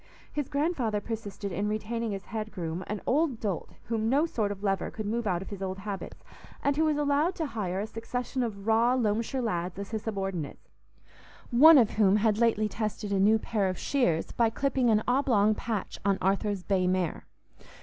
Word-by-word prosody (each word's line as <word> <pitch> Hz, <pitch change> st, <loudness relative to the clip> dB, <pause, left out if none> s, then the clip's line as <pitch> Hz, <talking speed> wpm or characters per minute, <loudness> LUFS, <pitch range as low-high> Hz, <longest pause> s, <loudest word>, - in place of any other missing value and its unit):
His 295 Hz, -3 st, -2 dB
grandfather 280 Hz, -8 st, 0 dB
persisted 205 Hz, -2 st, -5 dB
in 200 Hz, +4 st, -1 dB
retaining 215 Hz, 0 st, -2 dB
as 195 Hz, -, -8 dB
head 215 Hz, -1 st, -5 dB
groom 170 Hz, -2 st, -4 dB
an 210 Hz, 0 st, -4 dB
old 280 Hz, -3 st, +1 dB
dolt 200 Hz, -6 st, -3 dB
whom 225 Hz, -1 st, -1 dB
no 285 Hz, +5 st, +3 dB
sort 220 Hz, -10 st, -1 dB
of 200 Hz, 0 st, -7 dB
lever 195 Hz, -2 st, 0 dB
could 215 Hz, -, -6 dB
move 230 Hz, +2 st, -1 dB
out 180 Hz, -1 st, 0 dB
of -, -, -11 dB
his 200 Hz, -1 st, -7 dB
old 190 Hz, 0 st, -3 dB
habits, 195 Hz, 0 st, -6 dB, 0.4 s
and 285 Hz, 0 st, +2 dB
who 315 Hz, +2 st, +2 dB
was 305 Hz, -1 st, +2 dB
allowed 295 Hz, +5 st, +1 dB
to 320 Hz, -, -2 dB
hire 200 Hz, -8 st, -3 dB
a 205 Hz, -, -1 dB
succession 240 Hz, +4 st, -4 dB
of 205 Hz, -5 st, -4 dB
raw 230 Hz, +3 st, +4 dB
Loamshire 230 Hz, +2 st, 0 dB
lads 175 Hz, -5 st, -2 dB
as 200 Hz, +1 st, -6 dB
his 220 Hz, -2 st, -2 dB
subordinates, 195 Hz, -8 st, -4 dB, 0.8 s
one 300 Hz, +6 st, +9 dB
of 230 Hz, -5 st, +4 dB
whom 205 Hz, -2 st, +4 dB
had 215 Hz, 0 st, +2 dB
lately 225 Hz, -2 st, +3 dB
tested 210 Hz, 0 st, -4 dB
a 195 Hz, -, +2 dB
new 210 Hz, +3 st, +5 dB
pair 210 Hz, -3 st, -1 dB
of 185 Hz, -, -3 dB
shears 175 Hz, -, 0 dB
by 230 Hz, -1 st, +2 dB
clipping 260 Hz, +1 st, +1 dB
an 215 Hz, -1 st, +3 dB
oblong 245 Hz, -5 st, +3 dB
patch 215 Hz, -2 st, -4 dB
on 200 Hz, -1 st, +2 dB
Arthur's 195 Hz, 0 st, 0 dB
bay 185 Hz, -2 st, +1 dB
mare. 180 Hz, -3 st, -1 dB
215 Hz, 195 wpm, -28 LUFS, 195-240 Hz, 0.8 s, one